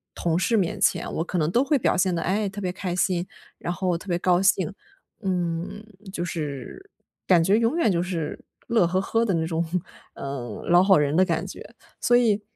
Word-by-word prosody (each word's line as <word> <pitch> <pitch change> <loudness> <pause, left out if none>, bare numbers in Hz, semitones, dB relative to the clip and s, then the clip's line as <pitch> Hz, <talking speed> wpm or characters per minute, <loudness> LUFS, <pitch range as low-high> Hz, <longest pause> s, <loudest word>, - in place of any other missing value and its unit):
同 170 0 0
事 230 +4 +1
面 185 -5 0
前， - - +1
我 165 - 0
可 180 - -3
能 155 +1 +1
都 245 +6 +3
会 290 0 +3
表 230 - +1
现 185 -1 +2
得， 165 - -1
哎， 200 +3 0
特 200 +1 -6
别 180 -1 -1
开 180 -1 -4
心， 180 -1 0 0.3
然 175 - -3
后 180 -2 0
特 195 - -13
别 175 -1 0
高 180 0 +3
兴。 195 +1 +2 0.5
嗯， 180 +2 -2 0.3
就 175 - -2
是 160 - -6 0.4
感 175 -3 +5
觉 200 +5 +4
永 230 +6 +1
远 230 - +3
就 170 -1 +1
是 170 -4 -4 0.3
乐 225 -7 +3
呵 185 +2 +1
呵 230 +3 +1
的 195 - 0
那 160 -1 0
种， 165 0 -1 0.5
呃， 130 -5 -6
老 175 +1 +7
好 190 -2 +5
人 145 0 +1
的 185 +3 +4
感 165 -3 -1
觉。 - - -10 0.2
所 240 - +3
以， 220 -4 +3
180 Hz, 225 characters per minute, -25 LUFS, 170-205 Hz, 0.5 s, 老